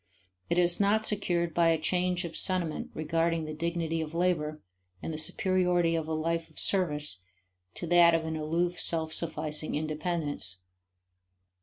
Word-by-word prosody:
It 170 - +1
is 175 -1 +4
not 210 +2 +3
secured 170 -5 0
by 170 0 +3
a 165 - +3
change 180 +2 0
of 170 - -7
sentiment 180 -4 0
regarding 165 +1 0
the 155 - -5
dignity 165 0 -2
of 160 +1 -6
labor, 160 -4 0 0.4
and 160 - -5
the - - -4
superiority 180 -1 +1
of 160 -1 -2
a 160 - -2
life 165 +1 -2
of - - -24
service 150 - 0 0.6
to - - -5
that 170 0 +6
of 165 -1 -1
an 160 0 -3
aloof 170 +3 -1
self 160 -1 +3
sufficing 155 -2 -1
independence. 155 - -3
165 Hz, 155 wpm, -29 LUFS, 155-175 Hz, 0.6 s, that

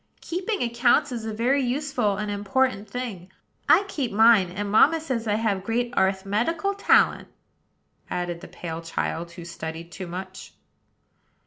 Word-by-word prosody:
"Keeping 370 - -2
accounts 240 +4 +2
is 230 -3 -4
a - - -2
very 245 +6 +1
useful 250 -5 0
and 210 0 -3
important 205 +1 0
thing. 200 -7 -6 0.4
I 400 - +7
keep 280 -11 -3
mine; 220 -3 +5
and 200 +3 -4
mamma 315 +9 +5
says 260 -8 -3
I 205 - +2
have 210 -4 0
great 240 +3 -1
arth 190 0 +1
met 210 +7 +1
i - - 0
cal 395 +5 -2
talent," 400 - +3 0.8
added 175 -1 -3
the - - -9
pale 165 -1 -6
child, 165 0 -3
who 170 -1 -9
studied 165 0 -7
too 185 +1 -7
much. 185 +2 -8
215 Hz, 160 wpm, -25 LUFS, 190-255 Hz, 0.8 s, I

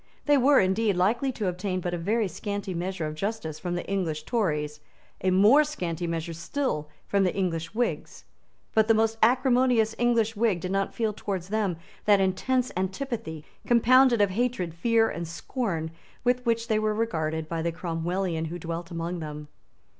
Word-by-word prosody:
They 290 - +5
were, 275 +1 +5
indeed, 195 +2 +2
likely 225 +9 +1
to 215 -4 -2
obtain 185 +1 -2
but 175 0 -3
a - - -1
very 210 +5 +1
scanty 200 +1 -4
measure 175 -1 -3
of 155 - -3
justice 180 -3 -4
from 175 0 -3
the 175 - -3
English 165 -6 -2
Tories, 150 -10 -1 0.4
a 190 - +3
more 210 +11 +6
scanty 175 - -3
measure 165 0 -3
still 165 - -2 0.2
from 200 -1 +2
the 185 - 0
English 170 -2 -2
Whigs; 240 +1 -2 0.5
but 220 -1 +4
the 225 - +5
most 225 0 +1
acrimonious 245 -2 +3
English 230 -2 +2
Whig 210 -4 +1
did 180 +2 -4
not 195 0 -1
feel 220 -2 0
towards 190 -3 -4
them 205 -5 0 0.3
that 205 -1 +5
intense 240 +7 +1
antipathy, 190 - -3 0.2
compounded 245 0 +5
of 200 -2 +3
hatred, 210 -6 -1
fear 225 +6 +2
and 170 -2 -4
scorn, 170 -2 -3 0.3
with 250 0 +1
which 230 0 +1
they 215 -2 +2
were 215 0 0
regarded 160 -8 -1
by 165 0 -3
the 170 +1 0
Cromwellian 170 0 -2
who 165 +2 -5
dwelt 170 0 -5
among 170 +1 -4
them. 150 -1 -7
195 Hz, 175 wpm, -27 LUFS, 170-230 Hz, 0.5 s, more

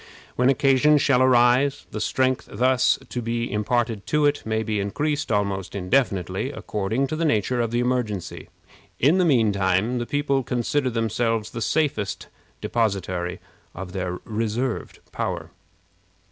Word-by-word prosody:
When 125 +1 +3
occasion 135 +2 +4
shall 135 -3 +3
arise, 130 +2 +3
the - - -4
strength 130 -1 0
thus 125 +4 +3
to 125 - -4
be 115 0 -2
imparted 110 0 -1
to 150 -1 +2
it 145 0 +2
may 110 0 0
be 110 -2 -1
increased 145 +10 -2
almost 100 -3 -1
indefinitely, 100 -1 0
according 110 +6 -2
to 145 - -3
the 165 - -2
nature 120 -3 +1
of 115 - 0
the 120 +1 0
emergency. 120 -7 -2 0.5
In 155 +9 +4
the 180 - +3
mean 120 -9 +3
time, 100 +5 +1
the 120 - -4
people 145 -2 0
consider 130 +2 -1
themselves 115 -1 -1
the 115 - -5
safest 145 -6 -1 0.3
depositary 95 -6 -1 0.4
of 90 0 -7
their 90 -1 -3
reserved 115 +3 -2
power. - - -4
120 Hz, 145 wpm, -24 LUFS, 105-130 Hz, 0.5 s, occasion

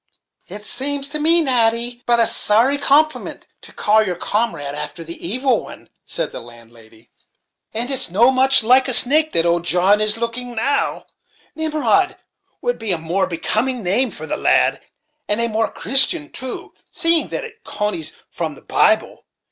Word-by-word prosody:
"It 210 0 -9
sames 280 +3 -1
to 300 +1 -3
me, 330 +3 +4
Natty, 240 -2 0
but 240 0 +3
a 230 - +4
sorry 240 +9 +2
compliment 300 +2 0 0.2
to - - -14
call 215 +1 +2
your 185 -4 -2
comrad 175 -7 -2
after 150 +3 -6
the 165 +1 -9
evil 250 +3 0
one," - - -13 0.2
said - - -4
the - - -7
landlady; 115 -1 -15 0.6
"and 235 +4 -1
it's 265 -8 0
no 230 +8 +3
much 265 -1 +3
like 255 +4 +4
a 255 - +2
snake 310 +6 +4
that 165 - +2
old 170 0 +1
John 185 +4 +3
is 215 +1 +3
looking 235 +1 -5
now, 275 +6 -1 0.5
Nimrod 315 +4 0 0.5
would - - -2
be 220 -3 -2
a 175 - +1
more 170 +4 -2
becoming 220 +8 -2
name 220 +8 +1
for - - -9
the - - -4
lad, - - +1 0.5
and 210 +2 0
a 235 - +2
more 220 0 -2
Christian, 275 - +2
too, 260 -1 -7 0.2
seeing 330 -1 +2
that - - -5
it 460 0 -14
conies 210 -7 -4 0.2
from - - -5
the - - -18
Bible. - - +1
235 Hz, 170 wpm, -18 LUFS, 190-275 Hz, 0.6 s, me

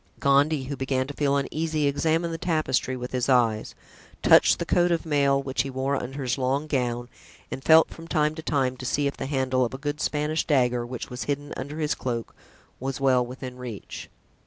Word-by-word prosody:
Gondy, 140 +1 +3
who 140 +2 -4
began 130 0 -1
to 145 - -7
feel 140 -1 +1
uneasy, 155 +2 -1
examined 160 +4 +1
the 165 - -5
tapestry 145 -6 0
with 125 0 -6
his 125 0 -1
eyes, 115 -4 +2 0.5
touched - - +6
the - - -3
coat 175 0 +2
of 170 0 0
mail 140 -3 +2
which 130 -1 -1
he 135 - -4
wore 135 +1 -1
under 135 +1 -4
his 125 +1 -1
long 135 +3 0
gown 120 -4 -1 0.4
and 135 - -5
felt 160 0 +6
from 165 0 -10
time 150 -2 +1
to 160 - -7
time 135 -5 0
to 130 - -8
see 145 +2 0
if 140 - -1
the - - -4
handle 130 -2 +1
of 125 +2 -2
a - - -5
good 145 +2 -4
Spanish 150 +1 0
dagger, 125 -4 +1
which 125 0 -6
was 125 - -5
hidden 145 0 -3
under 145 +4 -6
his 155 -1 0
cloak, 120 -3 -4 0.5
was 135 +1 -3
well 130 -2 +3
within 125 +1 -8
reach. 120 -5 -8
135 Hz, 205 wpm, -25 LUFS, 130-150 Hz, 0.5 s, touched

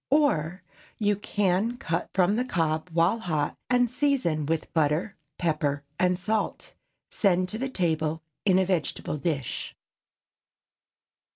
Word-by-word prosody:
Or, 185 - +2 0.3
you 205 -1 +2
can 205 +3 0
cut 165 -7 -2
from 190 +2 +3
the 245 - +1
cob 165 -7 -1
while 170 +7 +3
hot, 155 -8 -1
and 245 -1 +4
season 250 - +1
with 160 0 -2
butter, 160 +5 +1 0.2
pepper 150 -4 0 0.2
and 180 0 +3
salt. 215 +3 -2 0.4
Send 185 -2 +2
to 240 +6 -2
table 160 -6 0 0.2
in 190 -2 +4
a 190 - +3
vegetable 170 -4 -1
dish. 140 -6 -2
180 Hz, 120 wpm, -27 LUFS, 160-215 Hz, 0.4 s, and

